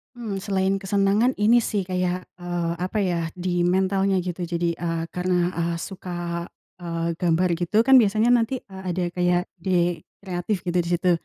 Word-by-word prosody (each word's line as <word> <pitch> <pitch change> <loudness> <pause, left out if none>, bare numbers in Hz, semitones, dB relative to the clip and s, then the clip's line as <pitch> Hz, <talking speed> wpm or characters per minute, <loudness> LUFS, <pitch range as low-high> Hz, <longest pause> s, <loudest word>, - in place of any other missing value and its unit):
Mmm, 220 -5 -4
selain 195 -1 0
kesenangan, 200 +5 +2
ini 225 +3 +4
sih, 205 -4 -1
kayak, 180 0 -1 0.2
eee, 175 -1 -2
apa 185 +4 -2
ya, 170 -3 0
di 175 -1 0
mentalnya, 190 +1 +2
gitu. 175 -1 -4
Jadi, 170 0 0
eee, 165 0 -3
karena, 180 -1 0
eee, 170 -1 -1
suka, 175 -1 -5 0.3
eee, 170 -1 -2
gambar 175 0 +2
gitu, 210 +6 +2
kan 265 0 +7
biasanya 220 +2 +3
nanti, 245 +1 +1
eee, 190 -1 -11
ada 180 - 0
kayak 175 0 +2 0.2
ide 175 -2 0 0.2
kreatif, 180 +1 -2
gitu, 175 0 -1
di 170 - -1
situ. 175 +1 +2
180 Hz, 165 wpm, -24 LUFS, 175-195 Hz, 0.3 s, kan